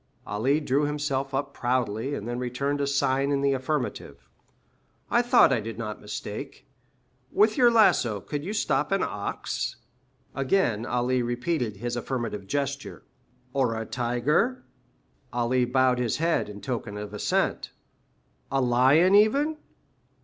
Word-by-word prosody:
Ali 125 +9 +1
drew 145 0 +1
himself 145 -2 -2
up 140 0 -2
proudly, 125 +1 -1
and 105 - -6
then 120 +1 -3
returned 140 +3 -2
a 140 - 0
sign 140 0 +1
in 140 -1 +1
the 140 0 +2
affirmative. 135 +1 -3 0.8
"I - - +4
thought - - +5
I - - +1
did 115 0 -6
not 110 -2 -5
mistake. 105 0 -7 0.7
With 215 +1 +3
your 245 -2 +6
lasso 215 - +4
you 100 - -6
could 150 - -4
stop 220 - 0
an 195 -1 +2
ox?" 100 0 -3 0.6
Again 130 - +1
Ali 125 +1 +1
repeated 120 -2 -2
his 120 +3 -3
affirmative 115 -5 -4
gesture. 140 +3 -3 0.5
"Or 125 -5 +1
a 110 - -4
tiger?" 130 - 0 0.7
Ali 120 +1 +1
bowed 125 0 +2
his 120 -3 0
head 165 -7 0
in 100 0 -9
token 110 -2 -4
of 105 0 -7
assent. 105 - 0 0.8
"A 135 - +1
lion 130 +9 +4
even?" 275 +10 +4
130 Hz, 140 wpm, -26 LUFS, 120-145 Hz, 0.8 s, your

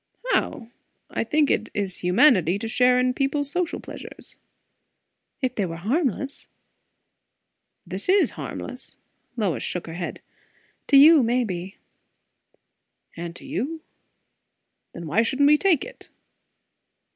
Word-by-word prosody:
"How? 235 - -1 0.4
I - - -1
think 300 -1 +2
it 220 - 0
is 195 -3 -2
humanity 180 - +4
to 225 - -5
share 250 +2 +3
in 250 0 +1
people's 280 +1 -1
social 345 +1 -2
pleasures." - - -10 1.1
"If 255 -1 0
they 200 -6 -1
were 165 - -6
harmless." 270 - -2 1.4
"This 185 - -5
is 395 +1 +4
harmless!" - - -7 0.4
Lois 200 -7 -1
shook 180 - -3
her 165 - -8
head. 175 +1 -5 0.7
"To 280 - +6
you, 305 +2 +8
maybe." 215 -7 -2 1.4
"And 170 0 -6
to - - -12
you. 315 +2 -4 1.1
Then 170 - -8
why 165 +8 +2
shouldn't 265 +5 +1
we 300 +1 +5
take 365 -8 +2
it?" - - -12
250 Hz, 120 wpm, -24 LUFS, 185-290 Hz, 1.4 s, you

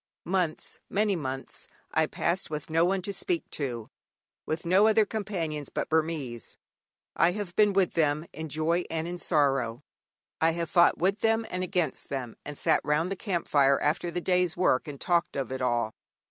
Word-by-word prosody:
Months, 180 -3 -1
very - - -11
many 205 -1 +3
months, 135 -4 -5 0.2
I - - +2
passed 175 +3 -1
with 150 0 -5
no 165 +1 +4
one 190 0 0
to 200 - -3
speak 335 - -1
to, 120 -6 -4 0.6
with 160 +2 -3
no 190 +5 +5
other 220 -1 +4
companions 175 -9 -3
but - - -3
Burmese. 155 -7 -2 0.6
I 170 +2 +4
have 200 -4 -5
been 210 -1 +5
with 190 -2 +2
them 155 -1 +1
in 160 +1 -6
joy 160 +4 +1
and 165 0 -2
in 175 0 -5
sorrow, 135 -7 +1 0.6
I 165 0 +4
have 170 0 -3
fought 175 -2 +5
with 195 +4 +1
them 225 0 +2
and 180 0 -2
against 180 -3 -2
them, 125 -4 -4
and 150 0 -7
sat - - +2
round 155 +5 +1
the - - -1
camp 185 -4 -3
fire 140 -1 +4
after 155 +4 0
the 175 +1 -3
day's 180 -1 +1
work 170 -6 +2
and 140 -2 -7
talked 175 -1 +1
of 135 -2 -3
it 130 - -4
all. 120 -3 0
165 Hz, 190 wpm, -28 LUFS, 145-185 Hz, 0.6 s, no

